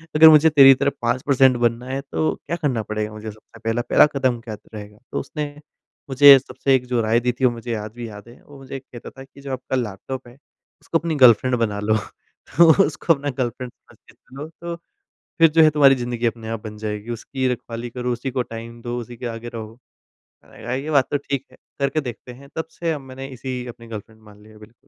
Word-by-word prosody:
अगर 160 +1 +9
मुझे 155 +1 +7
तेरी 135 -3 +8
तरह 140 +2 0
5 120 +2 0
पर्सेंट 130 -2 +4
बनना 120 +1 0
है, 135 +1 -2
तो 80 - -2
क्या 170 - -1
करना 140 -9 -1
पड़ेगा 105 0 -4
मुझे 110 0 -7
सबसे 110 +2 -18
पहला? 115 +1 0
पहला - - +7
कदम 130 -3 +1
क्या 110 -2 -7 0.2
रहेगा? 105 -1 -9
तो - - -2
उसने 150 +2 -4 0.6
मुझे 140 +1 +9
सबसे 130 +1 0
एक 125 -1 -1
जो 125 -2 0
राय 110 +1 +2
दी 125 +1 0
थी 130 - +3
वो 125 - +4
मुझे 120 0 -5
आज 105 0 -6
भी 120 -1 -6
याद 105 +1 -12
है, 120 - -17
वो 145 - -15
मुझे 135 0 -7
कहता 125 -2 -12
था 135 - -12
कि 135 +1 -17
जो 140 -1 -7
आपका 130 0 -4
लैपटॉप 125 +2 -5
है 120 - -15 0.5
उसको 165 - 0
अपनी 165 -1 -2
गर्लफ्रेंड 125 +1 +6
बना 105 -3 -1
लो 110 +1 +2 0.6
तो 170 -1 +8
उसको 165 - +1
अपना 145 -1 -4
गर्लफ्रेंड 125 0 -3
समझ - - -24
के - - -17
चलो 140 +4 -11
तो 170 0 -4 0.6
फ़िर 165 0 +7
जो 160 +1 +5
है 155 - +7
तुम्हारी 145 -2 +5
ज़िन्दगी 120 -1 -3
अपने 115 -1 -3
आप 115 -1 -4
बन 105 -1 -7
जाएगी। 105 +1 -5
उसकी 130 +3 -3
रखवाली 120 0 -6
करो, 125 +1 -3
उसी 120 +3 -4
को 130 0 -1
टाइम 115 0 -9
दो, 120 +1 -4
उसी 120 0 -9
के 120 - -7
आगे 115 0 -6
रहो। 110 0 -8 0.7
मैंने - - -16
कहा 120 - -2
ये 140 +4 -4
बात 140 -4 +3
तो - - +1
ठीक 140 -1 -4
है, - - -19 0.2
करके 140 +2 +1
देखते 125 -2 -8
हैं। 140 +3 -15
तब 160 - -3
से 165 -1 -2
अब 150 - -4
मैंने 135 0 -9
इसी 130 -1 -6
अपनी 115 -1 -10
गर्लफ्रेंड 110 0 -9
मान 105 -1 -17
लिया 110 +1 -17
है। 110 - -16
बिल्कुल। 110 +2 -15
125 Hz, 235 wpm, -21 LUFS, 115-135 Hz, 0.7 s, अगर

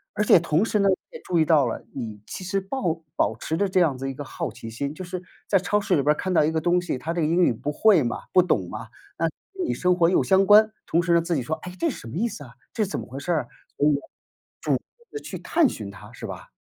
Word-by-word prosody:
而 210 - +1
且 195 - +7
同 165 +2 +1
时 220 - 0
呢， 200 -1 +4
你 190 - +4 0.2
也 - - -18
注 175 -2 0
意 160 - +4
到 155 -4 +4
了， 115 - -4
你 110 -5 -6
其 - - -7
实 190 +2 -1
抱 185 -6 -2
保 - - +1
持 160 - -3
着 200 +2 +2
这 185 0 +2
样 155 -7 +2
子 135 +1 -4
一 - - -4
个 145 +2 -7
好 - - -5
奇 115 - -9
心 140 +6 -4
就 185 - -7
是 180 0 -6 0.2
在 200 - +4
超 195 +3 +1
市 200 -2 +1
里 140 - +2
边 150 +2 +4
儿 - - -11
看 185 - -2
到 170 - +4
一 155 - +2
个 160 - 0
东 175 +2 +3
西， 175 -7 -3
它 165 - -3
这 170 - -1
个 150 - +2
英 170 +3 +2
语 - - +4
不 145 +6 -4
会 190 -1 +4
嘛、 120 - -2
不 185 - +6
懂 100 - 0
嘛， - - -7 0.3
那 165 - +1 0.3
跟 375 -2 -2
你 - - 0
生 180 0 +2
活 170 -2 +4
又 - - +4
相 195 0 +4
关， 215 +2 +7
同 170 - +2
时 170 0 +1
呢， 170 - +5
自 170 0 -1
己 135 - 0
说： 155 +6 -2
“哎， 180 0 -7
这 335 - +2
什 245 - -7
么 115 - -8
意 220 +7 +1
思 160 - -7
啊？ 125 -2 -13 0.2
这 215 -3 0
怎 195 - -4
么 - - -8
回 130 - -8
事 175 - -3
儿 160 -3 +2
啊？” - - -19 0.3
所 145 - +5
以 - - +3 0.7
主 - - -1
动 - - +3 0.3
地 430 - -5
去 - - -7
探 330 -3 +3
寻 105 - -6
它， 100 - -12
是 - - -8
吧？ - - -9
170 Hz, 325 characters per minute, -24 LUFS, 145-190 Hz, 0.7 s, 且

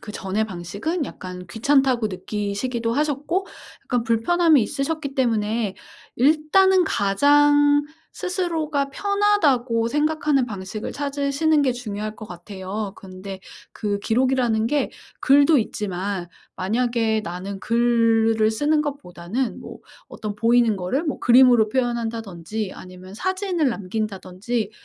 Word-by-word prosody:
그전의 210 0 -3
방식은 200 - -4
약간 180 -6 -8
귀찮다고 255 +2 +2
느끼시기도 210 +5 -3
하셨고 300 +7 -1 0.4
약간 245 -2 0
불편함이 290 +5 +3
있으셨기 285 +3 -3
때문에 225 -4 0 0.4
일단은 320 +7 +4
가장 290 +7 +4 0.3
스스로가 320 -6 -2
편하다고 285 - +1
생각하는 295 -1 +1
방식을 200 0 -6
찾으시는 285 +2 0
게 260 -3 +2
중요할 215 -3 -5
것 215 - -9
같아요. 195 +3 -6
근데 190 0 -9 0.3
그 205 -2 -2
기록이라는 235 0 +1
게 290 +4 0 0.3
글도 285 +2 +5
있지만 195 -3 -3 0.3
만약에 225 +2 0
나는 190 +2 -6
글을 230 -2 +2
쓰는 295 +7 +1
것보다는 250 - -4
뭐 - - -10 0.3
어떤 210 -1 -6
보이는 230 0 +3
거를 190 - -2
뭐 295 - -2
그림으로 245 -3 +5
표현한다든지 225 -5 -3
아니면 185 +1 -12
사진을 375 - -1
남긴다든지 215 0 -3
235 Hz, 295 characters per minute, -22 LUFS, 205-285 Hz, 0.4 s, 글도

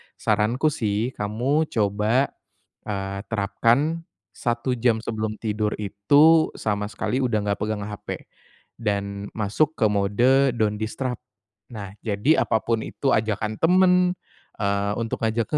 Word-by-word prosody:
Saranku 110 +8 +1
sih, 110 -2 -1
kamu 130 +9 0
coba, 110 +5 +1 0.6
eee, 100 -1 -3
terapkan 115 - +1 0.2
1 120 +2 -1
jam 115 -1 +2
sebelum 110 -1 -2
tidur 105 -1 -1
itu 145 +11 +4
sama 105 -1 -1
sekali 120 +4 -2
udah 120 -5 +1
enggak 100 -1 0
pegang 105 -1 -2
HP 105 -2 -9 0.7
dan 100 -2 -2
masuk 110 +9 +1
ke 110 - +2
mode 120 +7 +3
don't 105 -2 0
disturb. 125 +2 -3 0.6
Nah, 100 -3 -6 0.2
jadi 110 +9 +2
apapun 110 0 0
itu 140 - -2
ajakan 110 0 -1
temen, 180 +2 +5 0.7
eee, 100 0 0
untuk 115 -1 -3
ngajak 110 +1 0
110 Hz, 125 wpm, -24 LUFS, 105-125 Hz, 0.7 s, temen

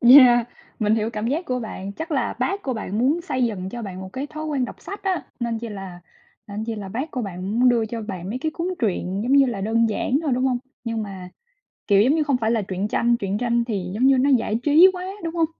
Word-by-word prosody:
Yeah, 245 -1 +8 0.3
mình 215 -1 +2
hiểu 220 0 0
cảm 215 -1 -3
giác 300 +9 -1
của 255 -4 -1
bạn, 200 -3 -6
chắc 320 - -6
là 275 - 0
bác 400 +1 -1
của 265 - -2
bạn 215 -2 -3
muốn 280 +8 +2
xây 255 -6 -1
dựng 195 -5 -2
cho 240 +4 -6
bạn 190 -3 -6
một 190 0 -9
cái 270 +2 -4
thói 310 +1 -7
quen 285 -5 0
đọc - - -7
sách 400 +1 -8
á, 380 -2 -1 0.2
nên 235 -1 -1
chi 230 +1 -6
là 195 -4 -8 0.5
nên 210 +2 -4
chi 230 0 -3
là 205 -3 -6
bác 255 +10 -4
của 250 - -3
bạn 190 -1 -5
muốn 250 - +6
đưa 235 -2 +3
cho 225 +1 -5
bạn 190 -4 -6
mấy 245 - -3
cái 315 +4 -1
cuốn 340 - -2
truyện, 195 -3 -1
giống 245 +4 0
như 275 -1 +6
là, 235 -6 -3
đơn 225 +3 +2
giản 250 +5 0
thôi, 295 -5 0
đúng 255 - 0
hông? 250 -2 +1 0.3
Nhưng 230 -1 -2
mà, 190 -3 -7 0.6
kiểu, 200 -1 +5
giống 260 +8 +4
như, 315 - +2
không 280 -3 +1
phải 225 -2 0
là 230 -2 +2
truyện 195 0 -3
tranh, 235 +2 +2
truyện 200 -1 -2
tranh 235 0 +1
thì, 195 -6 -3
giống 245 +6 +3
như, 270 -1 +5
nó 270 +3 +3
giải 230 -4 +2
trí 310 +5 +7
quá, 365 0 -5 0.2
đúng 330 0 -4
hông? 330 -1 +3
235 Hz, 270 wpm, -23 LUFS, 205-270 Hz, 0.6 s, Yeah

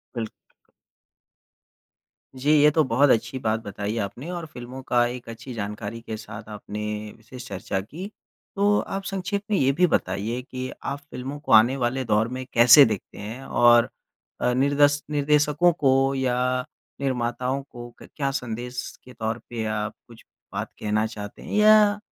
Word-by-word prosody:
Bill 115 -2 -2 2.1
जी, 135 +3 +1
ये 150 - +7
तो 155 +1 +3
बहुत 135 +2 +3
अच्छी 120 +2 +1
बात 110 -2 0
बताई 105 0 -4
आपने 115 - -4
और 175 -2 -4
फ़िल्मों 125 -2 -9
की 120 0 +3
एक 120 -2 -10
अच्छी 120 +3 -8
जानकारी 105 +1 -5
के 110 -1 -6
साथ 110 0 -10
आपने 105 0 -7 0.4
विशेष 125 +3 -11
चर्चा 95 -1 -3
की। 150 - -8 0.5
तो 205 +1 +3
आप 195 0 -4
संक्षेप 195 +1 -3
में 205 - +3
यह 135 -3 +3
भी 180 +2 +4
बताइए 110 - -1
कि 130 0 -6
आप 140 +1 -3
फ़िल्मों 140 0 -7
को 150 - -6
आने 120 +5 +6
वाले 130 +1 -1
दौर 110 0 +2
में 130 +2 -5
कैसे 120 +4 +9
देखते 105 -4 -4
हैं। 110 +6 -7
और 120 0 +5 0.5
अ, 125 - +2
निर्देश 145 +2 +3
निर्देशकों 150 +3 +3
को 135 -3 +2
या 130 -2 0 0.6
निर्माताओं 125 0 -1
को 120 -1 -9
क - - -11
क्या 140 -2 -1
संदेश 125 -1 -4 0.2
के 125 - -13
तौर 110 -1 -3
पे 115 -2 -3
आप 110 0 -2
कुछ 115 -1 -15 0.3
बात - - -3
कहना 105 +1 0
चाहते 105 -2 -8
हैं, - - -9
या 210 -1 +6
125 Hz, 165 wpm, -24 LUFS, 110-140 Hz, 2.1 s, कैसे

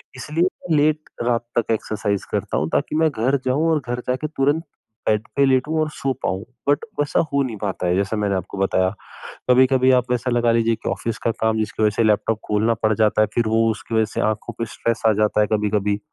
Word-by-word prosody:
इसलिए 150 +6 -1
मैं 180 -3 -1
लेट 155 +1 +3 0.3
रात 120 -1 +1
तक 115 - -2
एक्सरसाइज़ 105 -2 -2
करता - - -1
हूँ 75 +2 -1
ताकि 150 - 0
मैं 160 0 +3
घर 130 +4 +1
जाऊँ 145 +6 +1
और 155 - +2
घर 120 0 -2
जाके 130 +4 -1
तुरंत 145 +2 0 0.4
बेड 105 0 +1
पे 140 - +4
लेटूँ 135 +4 +1
और 155 - 0
सो 135 -2 -3
पाऊँ, 95 +2 -1 0.3
बट 145 +9 +2 0.2
वैसा 145 - +1
हो 140 - +3
नहीं 115 -4 -4
पाता 95 -3 -3
है 90 - +2
जैसा 100 +3 0
मैंने 100 -2 0
आपको 95 +2 -5
बताया। 95 -1 +2 0.6
कभी-कभी 130 +1 +5
आप 125 0 -6
ऐसा 125 +1 -1
लगा 120 -1 +2
लीजिए 115 0 +2
कि - - -5
ऑफ़िस 115 -2 -3
का 115 - +2
काम 110 0 0
जिसकी 110 0 -2
वज़ह 105 -1 +2
से 115 - +2
लैपटॉप 105 +1 +1
खोलना 110 +2 +2
पड़ 110 0 +3
जाता 110 0 +3
है 110 - +3
फिर 115 -2 +1
वो 115 +1 +2
उसकी 110 +1 -6
वज़ह 110 -1 +3
से - - -1
आँखों 110 -1 -3
पे 115 - 0
स्ट्रेस 115 0 -1
आ 110 - +5
जाता 105 0 +2
है 105 - +2
कभी-कभी, 105 -1 0
115 Hz, 225 wpm, -21 LUFS, 105-130 Hz, 0.6 s, कभी-कभी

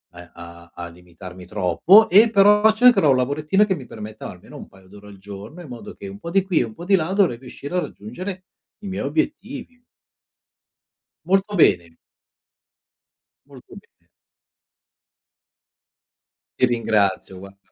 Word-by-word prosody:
a 90 0 -13
a 85 0 -13
a 85 0 -7
limitarmi 90 +1 -13
troppo 105 - +4
e 215 +5 +6
però 210 +1 +5
cercherò 240 - +4
un 130 - +4
lavorettino 150 +10 +1
che 190 -3 -1
mi 130 -5 -10
permetta 110 0 -9
almeno 90 - -13
un - - -11
paio 95 -1 -21
d'ore 105 +1 -15
al 100 -1 -13
giorno 100 - -11
in 170 - -11
modo 120 -1 -10
che 100 - -10
un 100 +1 -10
po' 170 - -8
di 195 +1 +2
qui 190 -4 0
e - - +2
un 110 - -11
po' 170 - -11
di 195 +1 +4
là 165 0 -1
dovrei 190 - +2
riuscire 140 +6 -9
a - - +2
raggiungere 185 - -7 0.4
i 205 - -9
miei 190 - -4
obiettivi. 265 -5 -4 1.5
Molto 195 +2 0
bene. 85 - +2 1.5
Molto - - -16
bene. - - -19 2.5
Ti 125 - +5
ringrazio, 105 -5 -1
guarda 100 +1 -13
125 Hz, 150 wpm, -21 LUFS, -, 2.5 s, e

